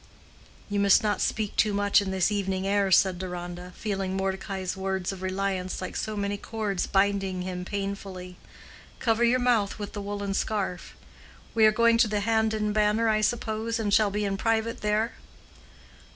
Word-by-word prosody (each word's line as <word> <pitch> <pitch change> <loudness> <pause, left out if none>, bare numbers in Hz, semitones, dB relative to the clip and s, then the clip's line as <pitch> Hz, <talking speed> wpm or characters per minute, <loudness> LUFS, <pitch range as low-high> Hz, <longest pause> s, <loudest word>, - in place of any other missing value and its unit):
"You 205 -1 -1
must 200 +3 +5
not 205 -3 0
speak 215 -2 -1
too 210 -2 +2
much 205 0 +4
in 200 - -3
this 190 +1 +1
evening 195 -2 -1
air," 200 0 +2
said 185 -1 +4
Deronda, 180 -1 -6
feeling 195 -3 -2
Mordecai's 190 -1 -3
words 190 -1 -2
of 190 -1 -8
reliance 190 0 -2
like 185 - -6
so 215 -1 -3
many 200 0 -1
cords 205 -3 -3
binding 195 -2 +1
him 180 -1 -4
painfully. 195 -2 -5 0.6
"Cover 230 -1 +1
your 240 +2 +4
mouth 240 -5 +1
with 205 -1 -6
the 205 - -4
woolen 200 0 -3
scarf. 195 -4 -2 0.6
We 220 -1 +6
are - - +5
going 230 +1 +3
to 230 - +5
the 210 -1 -1
Hand 220 +1 +2
and 210 -1 -1
Banner, 215 +2 +2
I 215 0 +2
suppose, 225 0 -1
and 210 -3 -1
shall 215 -1 +5
be 205 +1 -2
in 195 -1 -1
private 225 +1 0
there?" 215 +2 +1
200 Hz, 175 wpm, -27 LUFS, 190-215 Hz, 0.6 s, We